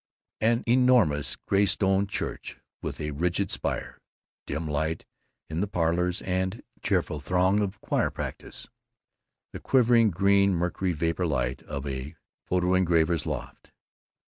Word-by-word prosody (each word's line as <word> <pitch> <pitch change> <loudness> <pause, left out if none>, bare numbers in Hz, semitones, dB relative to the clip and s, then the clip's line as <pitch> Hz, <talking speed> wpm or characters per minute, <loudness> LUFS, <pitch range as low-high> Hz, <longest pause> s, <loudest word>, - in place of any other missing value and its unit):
An 115 +2 +2
enormous 115 - +3
graystone 100 0 +2
church - - -5 0.2
with - - -5
a 75 0 -3
rigid 90 +6 -1
spire; - - -3 0.5
dim 80 0 -3
light 80 +2 -2 0.4
in 80 +2 -3
the 105 - 0
Parlors, 90 0 0
and 95 +2 -2 0.2
cheerful 75 - 0
droning 90 +6 +2
of 100 0 -3
choir - - 0
practise. - - -7 0.9
The - - -6
quivering 120 -3 +4
green 100 +1 +3
mercury 90 +1 -1
vapor 85 +3 -1
light 65 -3 -1
of 70 -1 -6
a 70 +3 -5 0.3
photo 90 0 +1
engraver's 85 -3 +2
loft. 65 -5 -6
90 Hz, 125 wpm, -27 LUFS, 80-100 Hz, 0.9 s, quivering